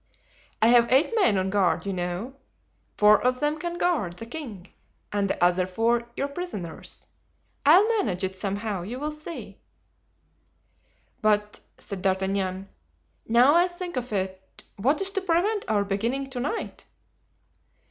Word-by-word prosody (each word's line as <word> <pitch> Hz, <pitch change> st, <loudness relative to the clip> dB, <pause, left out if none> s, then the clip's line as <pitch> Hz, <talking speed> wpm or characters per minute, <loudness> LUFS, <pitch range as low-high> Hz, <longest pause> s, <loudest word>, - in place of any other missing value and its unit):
"I 225 Hz, -, +6 dB
have 235 Hz, -1 st, +5 dB
eight 270 Hz, -, +4 dB
men 385 Hz, -, +3 dB
on 190 Hz, 0 st, 0 dB
guard, 195 Hz, -3 st, +1 dB
you 200 Hz, -, -2 dB
know. 180 Hz, +7 st, -4 dB, 0.6 s
Four 210 Hz, 0 st, +6 dB
of 250 Hz, 0 st, +1 dB
them 295 Hz, +1 st, 0 dB
can 345 Hz, +1 st, -4 dB
guard 320 Hz, -, 0 dB
the 205 Hz, +6 st, -9 dB
king 230 Hz, -, -8 dB, 0.4 s
and 200 Hz, -1 st, 0 dB
the -, -, -1 dB
other 180 Hz, +1 st, +3 dB
four 230 Hz, +5 st, 0 dB
your 280 Hz, -, 0 dB
prisoners. 280 Hz, -, -7 dB, 0.6 s
I'll 365 Hz, +8 st, +7 dB
manage 220 Hz, -, 0 dB
it 190 Hz, 0 st, -2 dB
somehow, 200 Hz, 0 st, -3 dB
you 230 Hz, +8 st, -6 dB
will 300 Hz, +2 st, -2 dB
see." 305 Hz, +2 st, -8 dB, 1.6 s
"But," 210 Hz, -1 st, +1 dB, 0.2 s
said 195 Hz, -2 st, -6 dB
D'Artagnan, 190 Hz, 0 st, -1 dB, 0.6 s
"now 245 Hz, +5 st, +5 dB
I 345 Hz, +2 st, +5 dB
think 355 Hz, -1 st, -7 dB
of 250 Hz, -1 st, -4 dB
it—what 195 Hz, -, -3 dB
is 390 Hz, -, 0 dB
to 390 Hz, -1 st, -1 dB
prevent 380 Hz, +4 st, +1 dB
our 205 Hz, -2 st, +1 dB
beginning 235 Hz, +8 st, -2 dB
to 250 Hz, -, -4 dB
night?" 295 Hz, -, -4 dB
230 Hz, 145 wpm, -26 LUFS, 195-300 Hz, 1.6 s, I'll